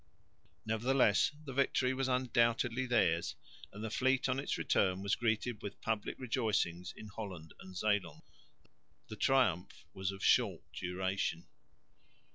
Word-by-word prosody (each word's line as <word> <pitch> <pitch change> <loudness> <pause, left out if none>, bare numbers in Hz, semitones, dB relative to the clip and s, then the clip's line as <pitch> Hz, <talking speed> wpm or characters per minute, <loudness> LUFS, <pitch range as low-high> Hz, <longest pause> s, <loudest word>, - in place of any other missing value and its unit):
Nevertheless 110 +1 +3
the 135 - -6
victory 130 -1 +2
was 135 0 -1
undoubtedly 125 0 +1
theirs; 95 -9 +2 0.4
and 105 +2 -8
the 110 - -3
fleet 130 +3 +2
on 130 0 0
its 140 - -2
return 95 0 +1
was 100 - 0
greeted 115 0 0
with 100 - -7
public 110 -2 -2
rejoicings 110 -8 -1
in 110 - -9
Holland 95 -7 -7
and 95 -1 -10
Zeeland. 105 0 0 0.9
The 110 - -6
triumph 115 - +1
was 95 0 -2
of 95 0 -8
short - - +3
duration. 90 -1 -2
110 Hz, 130 wpm, -34 LUFS, 95-125 Hz, 0.9 s, Nevertheless